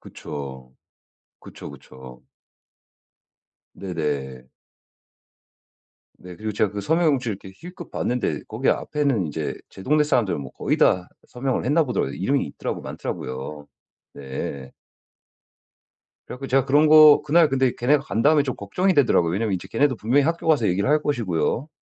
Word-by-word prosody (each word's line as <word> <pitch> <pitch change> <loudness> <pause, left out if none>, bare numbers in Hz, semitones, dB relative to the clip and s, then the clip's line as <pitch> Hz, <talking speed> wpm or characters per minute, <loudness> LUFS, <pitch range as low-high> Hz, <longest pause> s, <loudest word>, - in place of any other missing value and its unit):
그쵸. 65 -3 -9 0.7
그쵸, - - -11
그쵸. 65 -1 -14 1.5
네네. 70 -8 -4 1.7
네. 90 -1 -11
그리고 110 0 -4
제가 105 -1 0
그 105 0 -5
서명 165 +7 +1
용지를 125 -8 0
이렇게 95 - -10
힐끗 175 0 -11
봤는데 125 0 -2
거기 - - -2
앞에는 140 - 0
인제 75 - -4
제 95 - -12
동네 150 +4 +2
사람들은 120 - 0
뭐 65 - -8
거의 - - -1
다 90 -1 +2 0.2
서명을 125 0 -2
했나 155 +5 +2
보더라고요. 120 - -2
이름이 135 +10 0
있더라고 - - -5
많더라고요. 65 +3 -6 0.5
네. 70 0 -6 1.5
그래갖고 135 +2 -7
제가 135 0 +2
그런 145 +3 +4
거 155 -1 +8
그날 155 +2 +4
근데 130 -2 +1
걔네가 135 +4 +2
간 110 +4 -2
다음에 150 0 +4
좀 130 -3 -3
걱정이 180 - 0
되더라고요. 105 - +3
왜냐하면 105 0 -1
이제 90 - -6
걔네도 130 +1 +1
분명히 125 +7 +2
학교 165 +2 -2
가서 145 -9 +3
얘기를 100 +6 0
할 150 +1 +3
것이고요. 120 - -1
120 Hz, 335 characters per minute, -23 LUFS, 85-145 Hz, 1.7 s, 거